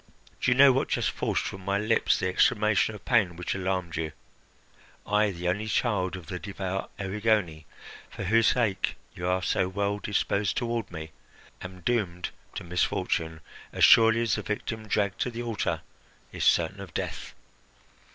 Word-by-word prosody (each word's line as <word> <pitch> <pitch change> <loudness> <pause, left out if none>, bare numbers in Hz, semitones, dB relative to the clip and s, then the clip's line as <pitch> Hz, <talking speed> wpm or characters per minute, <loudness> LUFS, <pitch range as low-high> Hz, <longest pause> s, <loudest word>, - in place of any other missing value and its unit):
Do - - +2
you 125 - +3
know 140 0 +8
what 135 - 0
just - - 0
forced - - -1
from 95 -1 -6
my 100 +1 0
lips 110 +2 +2
the 95 - -1
exclamation 105 +3 +2
of 100 - -13
pain 105 -8 +2
which 90 +1 -3
alarmed 95 -3 -2
you? 80 -1 -3 0.9
I, 105 +1 +2
the 90 -2 -4
only 100 +5 -1
child 105 -4 0
of 90 -3 -9
the 90 +2 -5
devout 95 0 -4
Erigone, 100 -5 0 0.4
for - - -7
whose 115 +4 +3
sake 105 -7 +1 0.2
you 90 - -4
are 90 0 +1
so 90 - +1
well 100 +1 -1
disposed 100 -1 0
toward 115 -4 -2
me, 80 -2 -7 0.5
am 90 0 -9
doomed 90 -5 -1 0.2
to - - -5
misfortune 80 -2 -1 0.3
as - - -1
surely 115 0 +7
as 115 - +1
the - - 0
victim 110 +1 -4
dragged 100 -2 0
to - - +1
the 120 0 -5
altar 115 -4 -2 0.5
is - - -4
certain - - +3
of - - -10
death. - - -4
100 Hz, 170 wpm, -27 LUFS, 90-110 Hz, 0.9 s, know